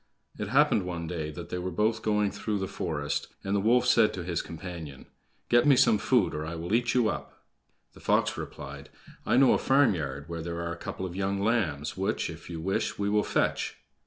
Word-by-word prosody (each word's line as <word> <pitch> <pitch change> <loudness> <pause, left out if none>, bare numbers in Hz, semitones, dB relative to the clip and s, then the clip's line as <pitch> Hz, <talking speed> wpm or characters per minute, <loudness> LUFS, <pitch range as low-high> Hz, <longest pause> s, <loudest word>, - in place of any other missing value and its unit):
It - - -2
happened 105 - +4
one 85 -2 -4
day 80 -2 -3
that 85 +3 -8
they 90 - -3
were 90 +1 -3
both 110 +5 0
going 105 -1 +1
through 105 -2 -2
the 95 -1 -2
forest, 80 -6 -3 0.2
and 100 +1 -1
the - - +3
wolf 120 +5 +3
said 115 -3 +4
to 90 - -4
his 85 -1 -1
companion: 80 -5 -8 0.4
"Get 120 +3 +4
me 140 - +7
some 125 -5 +4
food, - - +2
or 75 - -3
I 80 +2 -5
will 85 +4 -4
eat 120 +1 +2
you 120 -3 +4
up." - - -5 0.5
The - - -15
fox - - +2
replied: - - -8 0.4
"I 120 - +3
know 135 -1 +6
a - - +2
farmyard 80 - +2
where 85 -1 -5
there 85 +1 -4
are 85 0 -3
a - - -6
couple 95 +2 -5
of 90 -1 -6
young 100 +1 -1
lambs, 100 -10 0
which, 95 - -1
if - - -11
you 85 -2 -5
wish, 95 +4 -1
we 100 0 0
will 105 0 +3
fetch." - - 0
95 Hz, 220 wpm, -28 LUFS, 85-110 Hz, 0.5 s, me